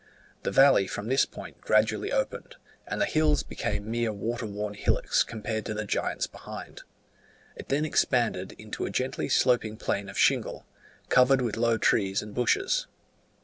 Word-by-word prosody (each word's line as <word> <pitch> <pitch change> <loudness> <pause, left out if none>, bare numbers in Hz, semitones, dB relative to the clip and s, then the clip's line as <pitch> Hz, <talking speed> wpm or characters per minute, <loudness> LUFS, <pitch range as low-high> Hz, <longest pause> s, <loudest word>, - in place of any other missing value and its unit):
The - - -2
valley 135 -8 +5
from 105 +4 -5
this 135 +1 +3
point - - -11
gradually 110 - +2
opened, - - -2 0.3
and - - -3
the 300 - +3
hills 155 - +2
became 105 +1 -4
mere 115 -1 0
water 115 +3 -3
worn 105 0 -4
hillocks 105 - +1
compared 110 -1 -4
to 110 - -3
the 110 0 -3
giants - - -1
behind: - - -10 0.7
it - - -10
then 145 +3 +1
expanded 120 -10 +1
into 110 0 -5
a - - -4
gently 130 +1 -2
sloping 120 -4 +2
plain 100 -2 -2
of 100 - -8
shingle, - - +1 0.4
covered 130 +1 +5
with 115 -4 -1
low 115 0 +2
trees 95 -2 +1
and 105 0 -10
bushes. 390 - +1
115 Hz, 160 wpm, -27 LUFS, 105-135 Hz, 0.7 s, valley